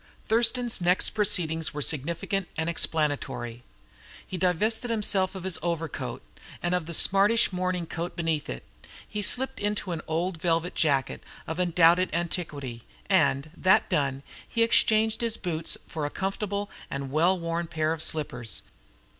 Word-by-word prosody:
Thurston's 235 -1 +2
next 180 +2 +3
proceedings 165 -7 0
were 150 - -3
significant 170 +7 -1
and 160 +1 -1
explanatory. 140 -8 -1 0.6
He - - -6
divested 200 +7 +1
himself 200 -4 +1
of 190 - -6
his 190 -2 -1
overcoat, 165 -2 -3 0.4
and 175 0 +1
of 180 -3 -1
the 170 - -4
smartish 200 +4 +4
morning 180 -1 -1
coat 170 +2 -5
beneath 165 -3 -1
it, 60 - -5 0.5
and 210 - -1
slipped 265 +6 0
into 205 -2 -1
an 165 -2 -3
old 165 +1 -2
velvet 165 0 +1
jacket 140 -4 +1 0.2
of 160 +2 -4
undoubted 175 0 +4
antiquity; 150 -8 -3 0.3
and, 140 +3 +3
that 190 0 +3
done, 135 -1 0 0.2
he 230 - +2
exchanged 220 -1 +3
his 230 -1 -1
boots 165 -3 -2
for 155 - -5
a 145 - 0
comfortable 200 +3 -3 0.2
and 140 -1 -4
well 170 +6 +3
worn 170 0 -2
pair 160 -1 0
of 160 - -6
slippers. 140 -9 -2
170 Hz, 145 wpm, -27 LUFS, 155-195 Hz, 0.6 s, smartish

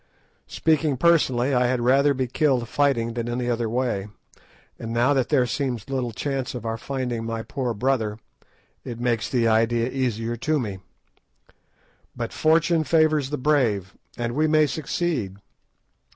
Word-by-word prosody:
Speaking 155 -3 +1
personally, 140 -5 +3
I 125 -1 +3
had 125 0 0
rather 135 +4 +3
be 130 0 0
killed 130 -1 +1
fighting 120 -4 +1
than 120 0 -3
any 120 +1 -2
other 120 -2 -1
way, 115 -5 -1 0.7
and 115 - -5
now 120 +4 +3
that 135 -3 0
there 125 - +3
seems 125 0 -3
little 125 -3 -1
chance 135 +2 -3
of 120 -2 -6
our 115 0 -1
finding 125 -3 -3
my 115 0 -4
poor 125 -2 -3
brother, 110 -2 0 0.7
it 120 -1 -7
makes 120 -3 0
the 120 -3 +1
idea 115 +2 +2
easier 120 -3 -2
to 155 +6 0
me. 100 -6 -4 1.4
But - - -4
fortune 165 +1 +3
favours 155 -2 +2
the 150 - -2
brave, 120 -9 +1 0.2
and 120 -1 -2
we 155 +4 +2
may 155 0 +4
succeed. 145 - -2
125 Hz, 150 wpm, -24 LUFS, 115-140 Hz, 1.4 s, may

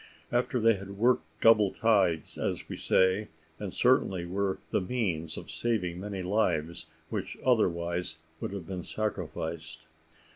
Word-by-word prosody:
After 125 +1 +1
they 115 -2 +4
had 100 +1 -9
worked 120 -6 +3 0.2
double 105 -3 +6
tides, 95 -7 +2
as - - -2
we - - -5
say, 95 +3 +2 0.3
and 100 -3 -4
certainly 95 -8 +2
were 95 +2 -1
the - - +2
means 90 -7 -2
of - - -7
saving 90 -7 -1
many 100 -1 -4
lives, 85 -5 0 0.2
which - - -3
otherwise 85 -8 +1 0.2
would - - -4
have 100 -4 -5
been 90 0 -4
sacrificed. 80 -6 -4
95 Hz, 140 wpm, -29 LUFS, 85-110 Hz, 0.3 s, double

